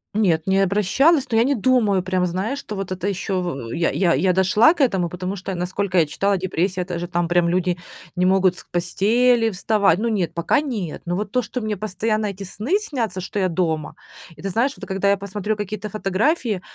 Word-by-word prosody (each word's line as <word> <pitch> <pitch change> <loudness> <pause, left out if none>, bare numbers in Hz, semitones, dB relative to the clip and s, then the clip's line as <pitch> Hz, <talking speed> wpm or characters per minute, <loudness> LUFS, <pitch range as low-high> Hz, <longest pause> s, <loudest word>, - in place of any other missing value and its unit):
Нет, 170 -7 +2
не 190 0 +2
обращалась, 210 - +3
но 225 - +2
я - - +5
не 280 +2 +1
думаю 215 -5 +2
прям, 185 -1 0
знаешь, 200 +11 -2
что 210 - -7
вот 195 -1 -5
это 185 +1 -3
ещё 190 -1 -2
в 135 -10 -5
я 165 0 +1
я 175 -3 +2
я 180 +7 +2
дошла 200 - +5
к 300 - -3
этому, 185 -8 +1
потому 185 +3 -4
что, 190 0 -5
насколько 185 +1 -2
я 165 - +5
читала, 195 +6 0
депрессия- 185 0 -1
это 175 -2 -4
же 175 - -4
там 175 -1 -1
прям 175 0 +2
люди 180 0 0 0.4
не 180 +1 +1
могут 190 -1 +3
с - - -10
постели 225 +7 +2
вставать. 200 -2 +2
Ну, 230 +1 0
нет, 180 -7 -1
пока 220 - +2
нет, 215 - -4
но 175 - 0
вот 205 +1 -3
то, 250 - +2
что 245 +2 -5
мне 215 -1 -2
постоянно 215 +1 -1
эти 195 0 -6
сны 235 - -1
снятся, 235 - -3
что 200 +3 -4
я 185 -1 +1
дома. 160 -3 -1 0.4
И - - -12
ты 195 - -2
знаешь, 250 +9 0
вот - - -8
когда 195 0 -1
я 200 - +3
посмотрю 205 +2 -3
какие-то 210 0 -5
фотографии- 215 - 0
195 Hz, 220 wpm, -22 LUFS, 180-215 Hz, 0.4 s, я